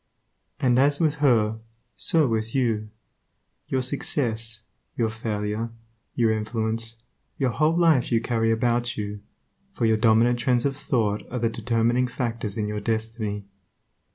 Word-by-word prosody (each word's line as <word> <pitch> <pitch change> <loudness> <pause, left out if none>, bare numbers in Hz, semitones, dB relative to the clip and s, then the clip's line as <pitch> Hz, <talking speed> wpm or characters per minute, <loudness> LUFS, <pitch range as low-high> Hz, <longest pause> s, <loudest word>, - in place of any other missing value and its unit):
And 125 -3 +3
as 145 +1 +3
with 155 -2 +2
her, 110 -5 +3 0.4
so 160 -4 +3
with 110 0 -2
you. 110 -5 0 0.8
Your 130 -1 0
success, 115 -5 -1 0.4
your 115 -2 +1
failure, 110 0 -3 0.5
your 115 -2 +3
influence, 110 +1 -2 0.4
your 130 -3 +1
whole 155 +6 +2
life 160 -9 +3
you 115 - +4
carry 115 -1 0
about 120 +1 +2
with 120 - -4
you, 105 -1 -4 0.6
for 120 - 0
your 110 -1 +4
dominant 115 +2 +4
trends 125 0 +1
of 140 -1 0
thought 110 -7 0
are 125 - -4
the 115 -1 +1
determining 120 +2 +1
factors 115 -4 -3
in 105 -1 -1
your 105 0 -3
destiny. 110 -1 -2
115 Hz, 145 wpm, -25 LUFS, 110-125 Hz, 0.8 s, you